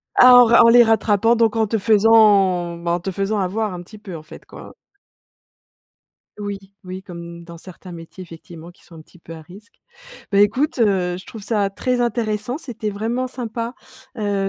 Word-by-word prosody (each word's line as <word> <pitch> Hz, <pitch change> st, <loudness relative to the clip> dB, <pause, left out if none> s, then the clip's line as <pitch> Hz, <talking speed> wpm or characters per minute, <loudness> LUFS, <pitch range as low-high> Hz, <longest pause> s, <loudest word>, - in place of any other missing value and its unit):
Ah, 250 Hz, 0 st, +7 dB
en 245 Hz, -1 st, +8 dB
ra 235 Hz, +1 st, +5 dB
en -, -, +6 dB
les 240 Hz, 0 st, +7 dB
rattrapant, 225 Hz, 0 st, +2 dB
donc 230 Hz, -1 st, +1 dB
en 220 Hz, -1 st, +1 dB
te 225 Hz, -, -1 dB
faisant, 200 Hz, -5 st, +3 dB
bah, 170 Hz, 0 st, -4 dB
en 175 Hz, -, 0 dB
te 190 Hz, +3 st, -5 dB
faisant 200 Hz, +3 st, -2 dB
avoir 200 Hz, +2 st, -2 dB
un 175 Hz, -, -7 dB
petit 215 Hz, +5 st, -14 dB
peu, 195 Hz, -4 st, -10 dB
en 155 Hz, -, -13 dB
fait, 160 Hz, +1 st, -14 dB
quoi. -, -, -13 dB, 1.7 s
Oui, 205 Hz, -1 st, -5 dB, 0.3 s
oui, 185 Hz, +1 st, -8 dB
comme 170 Hz, -2 st, -10 dB
dans 170 Hz, 0 st, -12 dB
certains 180 Hz, +1 st, -13 dB
métiers, 165 Hz, +2 st, -11 dB
effectivement, 170 Hz, 0 st, -13 dB
qui -, -, -27 dB
sont 170 Hz, -, -17 dB
un 160 Hz, -, -12 dB
petit 170 Hz, -, -22 dB
peu 165 Hz, -, -12 dB
à 160 Hz, -, -11 dB
risques. 195 Hz, +8 st, -17 dB, 0.5 s
Beh, 200 Hz, +1 st, +4 dB
écoute, 255 Hz, +7 st, 0 dB
heu, 185 Hz, -5 st, +1 dB
je 185 Hz, -, -11 dB
trouve 220 Hz, -, -11 dB
ça 205 Hz, -2 st, -1 dB
très 250 Hz, +5 st, -2 dB
intéressant, 230 Hz, +2 st, -2 dB
c'était 225 Hz, -8 st, -6 dB
vraiment 230 Hz, +5 st, -3 dB
sympa, 235 Hz, -1 st, -6 dB, 0.4 s
heu, 200 Hz, -2 st, -2 dB
205 Hz, 195 wpm, -19 LUFS, 180-225 Hz, 1.7 s, en